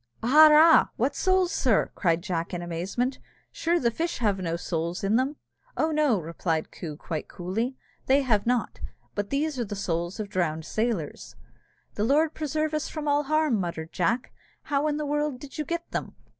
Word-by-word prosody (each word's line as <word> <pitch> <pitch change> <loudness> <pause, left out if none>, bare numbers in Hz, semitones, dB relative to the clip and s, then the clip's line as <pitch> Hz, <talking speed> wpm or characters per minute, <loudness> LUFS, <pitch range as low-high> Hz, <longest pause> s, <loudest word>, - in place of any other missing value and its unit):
"Arrah! 310 +5 +7
what 260 +5 0
souls, 370 -1 +2
sir?" 235 -6 +2
said 170 -1 +2
Jack, 175 -2 -3
in 175 - -4
amazement; 190 +10 -2 0.3
"sure 340 +1 +1
the 235 -6 +1
fish 335 +7 -2
have 205 -5 +1
no 170 -2 -2
souls 170 +1 -3
in 200 +3 +2
them?" 265 +5 +1 0.4
"Oh! 320 - +1
no," 300 -9 +2
replied 165 -1 -2
Coo, 155 -4 -7
quite 155 -1 -5
coolly, 225 +9 -3
"that - - -36
they 275 +2 +5
have 220 -5 +1
not; 245 -1 0 0.3
but 205 -1 -3
these 290 0 -1
are 240 - 0
the 205 - -5
souls 175 0 -2
of 215 - -3
drowned 160 -5 -1
sailors." 215 -9 -3 0.6
"The 205 - -2
Lord 295 +6 +3
preserve 310 0 -2
us 305 0 -1
from 305 -2 -5
all 290 0 +2
harm!" 310 -6 +2
muttered 170 -3 -4
Jack, 230 +8 0 0.3
"how 290 +1 0
in 295 -1 0
the 300 - -2
world 295 -2 -1
did 285 +2 -10
you 305 - -1
get 340 +3 -4
them?" - - -4
240 Hz, 185 wpm, -26 LUFS, 180-300 Hz, 0.6 s, Arrah